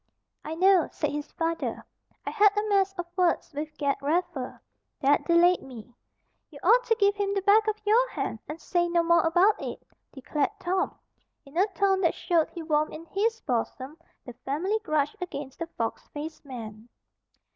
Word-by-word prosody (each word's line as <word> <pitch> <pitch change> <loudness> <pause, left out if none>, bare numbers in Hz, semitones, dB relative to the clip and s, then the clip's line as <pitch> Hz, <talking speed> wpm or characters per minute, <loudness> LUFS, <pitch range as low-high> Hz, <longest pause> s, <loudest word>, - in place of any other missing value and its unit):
"I 315 - -5
know," 370 -1 +4
said 300 - -2
his 295 +1 -5
father. 330 0 -2 0.4
"I - - -2
had 415 -1 +4
a 420 +1 +1
mess 395 -1 +3
of 350 - -3
words 360 -3 +1
with 300 +1 -6
Ged 280 -2 0
Raffer. 290 -3 -2 0.4
That 285 +1 +3
delayed 345 +1 +4
me." 245 -2 -11 0.6
"You 295 - -13
ought 470 +7 +5
to 455 - +3
give 405 -2 +3
him 400 -1 -1
the 395 - -1
back 425 +2 +5
of 430 0 0
your 475 +4 +4
hand, 225 - -4
and 310 +2 -6
say 345 0 0
no 340 0 +2
more 340 0 +4
about 355 +6 +3
it," - - -6 0.3
declared 285 +2 -1
Tom, 370 +1 -1 0.5
in 275 +2 -16
a 380 +4 +3
tone 385 +2 +2
that 335 - +2
showed 335 -3 +1
he 335 - -7
warmed 305 -1 0
in 325 +2 -9
his 455 +3 0
bosom 260 +2 -3 0.3
the 245 - -8
family 365 +11 -1
grudge 305 0 0
against 280 -6 -6
the 335 - -3
fox 230 -8 -4
faced 305 +1 -8
man. 225 -3 -9
335 Hz, 180 wpm, -27 LUFS, 290-390 Hz, 0.6 s, ought